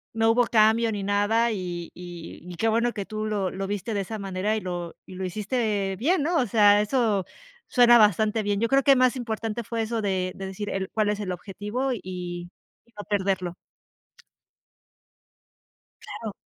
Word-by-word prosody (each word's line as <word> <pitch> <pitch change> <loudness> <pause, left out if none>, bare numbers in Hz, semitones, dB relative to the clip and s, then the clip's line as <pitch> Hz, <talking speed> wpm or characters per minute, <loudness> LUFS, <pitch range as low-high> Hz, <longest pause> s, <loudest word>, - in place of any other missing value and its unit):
No 225 0 +3
hubo 240 +1 +4
cambio 225 +1 +4
ni 205 - -3
nada, 205 +4 +2
y 175 -4 -4
y 175 -2 -9
y 180 -1 -9
qué 225 +6 0
bueno 235 +2 +2
que 205 - -4
tú 215 +2 -4
lo 205 -3 -1
lo 195 +1 -4
viste 205 +2 -3
de 200 - 0
esa 215 +2 -5
manera 195 +2 -1
y 215 - -2
lo 175 -2 -5
y 185 - -10
lo 190 +1 -4
hiciste 205 0 -1
bien, 310 - +2
¿no?, 335 +3 +1
o 255 - +2
sea, 205 -2 +5
eso 210 -4 +1 0.4
suena 240 -1 +6
bastante 215 +1 +3
bien. 205 0 0
Yo 230 - +2
creo 275 +1 +3
que 275 -1 +6
más 255 0 +3
importante 225 -2 -3
fue 230 +1 -3
eso 225 0 -2
de 185 -2 0
de 195 - -6
decir: 200 +2 -5
"El 190 -1 -3
cuál 215 -1 +1
es 210 0 -1
el 190 -3 -3
objetivo, 210 +8 -3
y 225 - -4 0.9
y 235 - -29
no 205 - -7
perderlo". 190 -3 0 2.5
Claro. 220 -3 -7
210 Hz, 185 wpm, -25 LUFS, 195-230 Hz, 2.5 s, suena